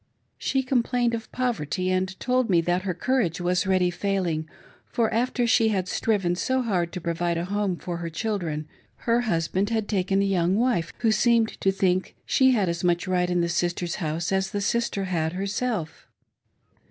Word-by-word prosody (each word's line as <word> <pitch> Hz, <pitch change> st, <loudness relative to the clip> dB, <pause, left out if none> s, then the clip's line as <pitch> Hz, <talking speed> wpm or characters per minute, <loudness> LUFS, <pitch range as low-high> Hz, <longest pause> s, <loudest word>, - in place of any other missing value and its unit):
She 265 Hz, -1 st, 0 dB
complained 245 Hz, -2 st, +1 dB
of 225 Hz, -1 st, -5 dB
poverty, 185 Hz, -, -1 dB
and 185 Hz, 0 st, -1 dB
told 255 Hz, -1 st, +1 dB
me 175 Hz, -3 st, +4 dB
that 175 Hz, +2 st, 0 dB
her 185 Hz, -1 st, -2 dB
courage 235 Hz, -10 st, 0 dB
was 180 Hz, +2 st, 0 dB
really 185 Hz, -2 st, +3 dB
failing; 175 Hz, -5 st, -1 dB, 0.4 s
for, 230 Hz, -2 st, 0 dB
after 245 Hz, +1 st, +1 dB
she 225 Hz, -1 st, +4 dB
had 190 Hz, -4 st, 0 dB
striven 195 Hz, -4 st, 0 dB
so 260 Hz, +7 st, 0 dB
hard 180 Hz, -7 st, 0 dB
to 180 Hz, -, -3 dB
provide 170 Hz, 0 st, -1 dB
a 170 Hz, -, -2 dB
home 200 Hz, -1 st, -1 dB
for 175 Hz, 0 st, -5 dB
her 170 Hz, 0 st, -4 dB
children, 165 Hz, -5 st, -3 dB, 0.4 s
her 235 Hz, 0 st, +3 dB
husband 190 Hz, -1 st, 0 dB
had 220 Hz, -2 st, -1 dB
taken 195 Hz, -1 st, +1 dB
a -, -, +1 dB
young 185 Hz, -2 st, +2 dB
wife, 225 Hz, -7 st, +1 dB
who 225 Hz, -, +3 dB
seemed 230 Hz, +1 st, +3 dB
to 195 Hz, -, +3 dB
think 185 Hz, -1 st, 0 dB
she 260 Hz, -1 st, +4 dB
had 215 Hz, -7 st, +2 dB
as 170 Hz, 0 st, -2 dB
much 175 Hz, +1 st, +1 dB
right 180 Hz, -1 st, +1 dB
in 175 Hz, -1 st, +1 dB
the 170 Hz, -, +1 dB
sister's 175 Hz, 0 st, -1 dB
house 165 Hz, +1 st, -2 dB
as 190 Hz, 0 st, +1 dB
the 205 Hz, -, -3 dB
sister 205 Hz, -1 st, 0 dB
had 165 Hz, -3 st, -1 dB
herself. 200 Hz, -2 st, -3 dB
190 Hz, 185 wpm, -25 LUFS, 175-225 Hz, 0.4 s, me